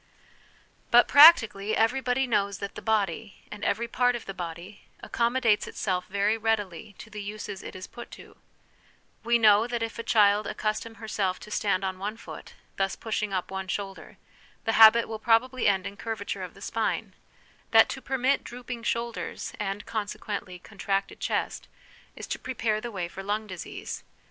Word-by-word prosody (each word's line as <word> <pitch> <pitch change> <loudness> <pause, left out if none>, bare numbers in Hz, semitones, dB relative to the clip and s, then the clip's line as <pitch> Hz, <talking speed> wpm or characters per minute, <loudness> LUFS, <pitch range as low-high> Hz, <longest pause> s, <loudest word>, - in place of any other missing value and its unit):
But, 240 0 +6
practically, 225 -9 +7
every 235 +4 +2
body 255 +1 +1
knows 200 -5 0
that 200 - -6
the - - -8
body, 210 -1 -1
and 210 - -8
every 235 +1 0
part 245 +1 +2
of 240 - -6
the 195 - -6
body, 175 +2 -7 0.2
accommodates 235 -2 +1
itself 180 -2 -2
very 200 +3 +1
readily 205 -3 -2
to 220 - -12
the 210 -1 -6
uses 205 -1 -6
it - - -9
is 185 0 -7
put 240 0 -10
to: - - -15 0.9
we 235 +1 +3
know 215 0 +5
that 240 -1 -2
if 230 0 -5
a - - 0
child 210 -2 +3
accustom 215 +1 -3
herself 205 -4 -2
to 210 - -11
stand 200 -2 0
on 190 -1 -3
one 210 +3 -4
foot, - - -11 0.2
thus 195 0 0
pushing 215 -2 -3
up 185 -1 -3
one 190 0 -4
shoulder, 195 +1 -5 0.5
the 225 - +2
habit 225 +1 +7
will 220 -1 -5
probably 240 +3 +2
end 190 -2 +2
in 200 - -6
curvature 220 -1 -4
of - - -7
the - - -15
spine; - - -2 0.6
that - - +7
to - - -5
permit 265 +1 0
drooping 245 0 -7
shoulders, 235 0 -3
and, 205 0 -3
consequently, 205 -3 -4
con 195 +3 -17
tracted 195 0 -1
chest, - - -2 0.5
is - - -7
to - - -4
prepare 225 -4 -1
the 240 - -5
way 190 -6 -4
for 190 - -8
lung 210 +2 -2
disease. 185 -4 -7
215 Hz, 175 wpm, -27 LUFS, 195-230 Hz, 0.9 s, practically